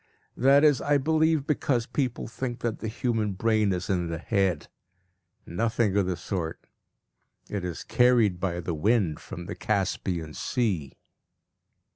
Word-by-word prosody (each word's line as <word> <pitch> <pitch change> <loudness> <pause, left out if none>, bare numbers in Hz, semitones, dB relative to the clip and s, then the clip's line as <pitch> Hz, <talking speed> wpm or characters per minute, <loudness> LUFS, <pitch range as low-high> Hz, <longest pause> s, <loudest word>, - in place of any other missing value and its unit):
That 140 +3 +5
is, 150 -4 +5
I 145 0 +3
believe, 160 +1 +2
because 130 -5 0
people 130 -3 -2
think 120 +1 -5
that 115 -2 -2
the 110 - -4
human 110 -2 -1
brain 110 +1 +2
is 90 -1 -2
in 90 -3 0
the 85 0 -3
head. 95 -2 0 0.8
Nothing 110 +2 0
of 100 -3 +2
the 90 -2 -1
sort; 85 -3 -4 0.9
it 100 -3 -2
is 90 -2 -4
carried 120 -7 +3
by 90 -2 -2
the 85 0 -3
wind 90 -1 +1
from 85 - -8
the 100 - -5
Caspian 95 -7 -2
Sea. 100 - -2
105 Hz, 145 wpm, -27 LUFS, 90-120 Hz, 0.9 s, That